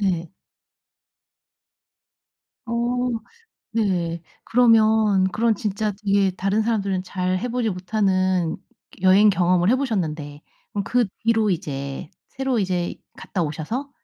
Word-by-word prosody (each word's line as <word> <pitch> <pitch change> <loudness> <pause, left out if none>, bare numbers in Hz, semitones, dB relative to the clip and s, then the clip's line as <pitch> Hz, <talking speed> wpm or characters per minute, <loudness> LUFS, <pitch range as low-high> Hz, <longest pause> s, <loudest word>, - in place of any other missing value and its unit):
네. 175 -4 -1 2.4
어 230 - -5 1.0
네. 180 -7 -1 0.2
그러면 220 -4 +4
그런 230 0 +2
진짜 210 +1 -2
이게 200 -1 +3
다른 195 +4 +1
사람들은 200 -4 0
잘 185 0 -1
해 245 - -3
보지 240 -2 -1
못하는 185 -2 0 0.5
여행 195 +3 +6
경험을 180 -1 +2
해 255 - +4
보셨는데, 160 - -3 0.3
그럼 200 -1 -2
그 245 +1 +2 0.2
뒤로 225 -2 +3
이제 140 -6 -4 0.2
새로 265 -2 -1
이제 180 -3 -1 0.2
갔다 180 - -3
오셔서 165 - -4
195 Hz, 220 characters per minute, -23 LUFS, 180-220 Hz, 2.4 s, 여행